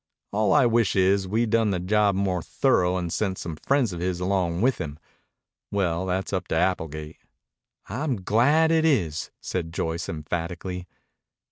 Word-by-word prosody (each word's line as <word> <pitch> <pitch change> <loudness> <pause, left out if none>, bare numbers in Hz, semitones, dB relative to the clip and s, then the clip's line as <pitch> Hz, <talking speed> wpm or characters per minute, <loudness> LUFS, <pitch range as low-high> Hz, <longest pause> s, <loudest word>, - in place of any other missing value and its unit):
All 105 0 +1
I 145 -4 +5
wish 115 -3 +2
is 95 0 +3
we'd 110 +3 0
done 115 -2 +3
the 95 -3 0
job 100 +2 +2
more 95 -2 0
thorough 90 +2 +1
and 85 -2 -3
sent 95 -3 -1
some 85 -2 -5
friends 125 - +1
of 85 - -5
his 90 0 -2
along 90 -2 0
with 130 +2 +2
him. 75 -1 -5 0.7
Well, 95 -2 0
that's 95 +2 -2
up 95 - -2
to - - -1
Applegate." 80 -3 -1 0.7
"I'm 120 -2 -2
glad 145 - +4
it 160 -1 +3
is," 90 - +1
said 85 -3 -3
Joyce 85 +1 -3
emphatically. 85 +3 -4
95 Hz, 160 wpm, -25 LUFS, 85-110 Hz, 0.7 s, I